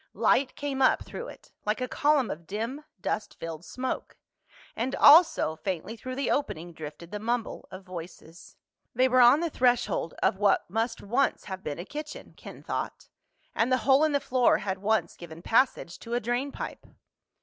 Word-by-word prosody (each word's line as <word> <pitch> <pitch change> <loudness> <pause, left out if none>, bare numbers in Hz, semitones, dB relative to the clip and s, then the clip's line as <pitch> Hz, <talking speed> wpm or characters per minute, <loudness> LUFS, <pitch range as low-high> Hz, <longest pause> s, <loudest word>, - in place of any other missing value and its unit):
Light 270 -1 +2
came 280 -2 -3
up 260 - +4
through 485 - -7
it, - - -13
like 210 +3 -1
a 255 - -2
column 290 -2 +2
of 160 +1 -8
dim 230 +8 -4 0.2
dust 210 +4 -3
filled 165 0 -6
smoke. 255 +7 -5 0.6
And 250 +4 -2
also, 310 - +6
faintly 190 +4 -4
through 255 +3 -7
the 275 - -1
opening, 175 - -2
drifted 160 +2 -9
the 210 - -4
mumble 235 +1 -3
of 185 +1 -10
voices. 175 -2 -10 0.4
They 255 +2 +4
were 255 0 +4
on 245 +6 +7
the 340 -2 -1
threshold 245 - +1
of 190 - +2
what 205 -1 +3
must 225 +5 -2
once 240 +7 0
have 190 -1 -7
been 145 - -4
a 175 - -6
kitchen, 300 +5 -8
Ken - - -11
thought. - - -5 0.4
And 235 +3 +1
the 255 - +4
hole 275 +2 +5
in 310 - +3
the 285 - +2
floor 255 -2 +3
had 190 -1 -3
once 215 +2 0
given 170 0 -11
passage 225 -7 +1
to 235 0 -4
a - - +2
drain 245 +5 -2
pipe. - - -7
230 Hz, 185 wpm, -28 LUFS, 185-265 Hz, 0.6 s, on